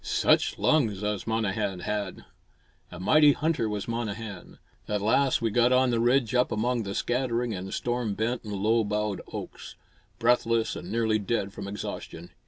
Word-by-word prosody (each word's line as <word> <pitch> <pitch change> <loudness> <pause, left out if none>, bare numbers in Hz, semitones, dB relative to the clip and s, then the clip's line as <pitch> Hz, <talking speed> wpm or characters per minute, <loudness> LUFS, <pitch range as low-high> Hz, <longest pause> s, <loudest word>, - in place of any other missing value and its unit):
Such - - +2
lungs 110 -11 +2
as 105 0 -2
Monnehan 105 -4 -1
had! 105 -3 -4 0.7
A 90 - -9
mighty 145 +9 +5
hunter 155 -8 0
was 105 -1 -4
Monnehan. 110 -4 -5 0.3
At 105 -1 -1
last 120 +5 +2
we 115 - +1
got 120 +3 +3
on 130 0 +4
the 115 - +1
ridge 120 0 +2
up 125 0 +2
among 120 +3 0
the 100 -2 -5
scattering 120 -2 -1
and 95 0 -6
storm 120 -4 -2
bent 115 +3 -1
and 105 -2 -6
low 110 +3 +2
boughed 105 -1 -2
oaks; - - -8 0.4
breathless 115 -1 +2
and 90 - -7
nearly 110 -1 +1
dead 100 -1 -2
from 100 - -7
exhaustion. 90 -4 -7
110 Hz, 165 wpm, -27 LUFS, 100-120 Hz, 0.7 s, mighty